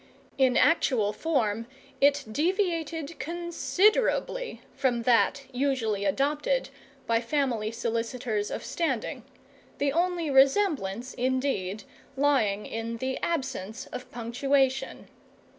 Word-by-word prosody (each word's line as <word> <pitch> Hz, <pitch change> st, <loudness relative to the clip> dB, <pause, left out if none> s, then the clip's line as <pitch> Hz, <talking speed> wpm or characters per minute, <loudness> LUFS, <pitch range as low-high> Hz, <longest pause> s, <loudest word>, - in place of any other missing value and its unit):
In 260 Hz, -2 st, +4 dB
actual 235 Hz, -10 st, +3 dB
form 230 Hz, -5 st, 0 dB, 0.3 s
it 285 Hz, 0 st, +4 dB
deviated 330 Hz, -, -1 dB
considerably 395 Hz, +8 st, 0 dB
from 245 Hz, -4 st, 0 dB
that 250 Hz, +3 st, +3 dB
usually 245 Hz, -6 st, 0 dB
adopted 295 Hz, -, 0 dB, 0.4 s
by 230 Hz, 0 st, +2 dB
family 240 Hz, -4 st, 0 dB
solicitors 230 Hz, -1 st, -2 dB
of -, -, -5 dB
standing, 265 Hz, -1 st, -2 dB, 0.6 s
the 280 Hz, -1 st, +1 dB
only 345 Hz, -2 st, 0 dB
resemblance, 270 Hz, -, +2 dB
indeed, 250 Hz, -6 st, -1 dB, 0.3 s
lying 250 Hz, -8 st, +2 dB
in 225 Hz, +1 st, -4 dB
the 260 Hz, +2 st, -2 dB
absence 260 Hz, -, -3 dB
of 250 Hz, 0 st, -7 dB
punctuation. 265 Hz, +3 st, 0 dB
265 Hz, 95 wpm, -28 LUFS, 230-300 Hz, 0.6 s, In